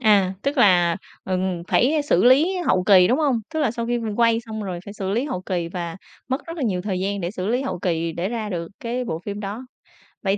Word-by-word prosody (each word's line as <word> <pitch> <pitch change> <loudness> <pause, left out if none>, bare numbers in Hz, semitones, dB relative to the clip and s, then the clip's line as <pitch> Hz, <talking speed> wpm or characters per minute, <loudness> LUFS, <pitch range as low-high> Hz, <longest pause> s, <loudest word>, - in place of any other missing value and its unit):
À, 200 -4 +4
tức 280 +1 -1
là, 175 -6 +5 0.3
ừm, 185 -2 -1
phải 295 +4 +3
xử 235 -10 +2
lý 300 +10 +5
hậu 185 - +3
kỳ, 185 -3 +6
đúng 255 - +2
hông? 275 -7 +2
Tức 315 - 0
là 280 -6 +2
sau 235 +1 -4
khi 240 0 0 0.2
quay 230 -1 +3
xong 220 -2 -6
rồi 185 -3 -4
phải 200 - -8
xử 195 -2 -3
lý 230 +6 0
hậu 220 -11 -4
kỳ, 175 -3 -2
và 170 -1 -5 0.3
mất 260 +2 -2
rất 330 +1 -6
là 300 - -3
nhiều 190 -7 0
thời 190 -2 -2
gian 200 +1 -1
để 170 -1 -2
xử 185 -2 -4
lý 245 +5 +1
hậu 270 -9 -3
kỳ 165 -2 -1
để 175 +4 -2
ra 225 -2 -3
được 170 -4 -4
cái 245 +2 -2
bộ 160 -9 -3
phim 205 0 -5
đó. 210 +5 -5 0.6
Vậy 195 0 +1
205 Hz, 250 wpm, -23 LUFS, 185-240 Hz, 0.6 s, kỳ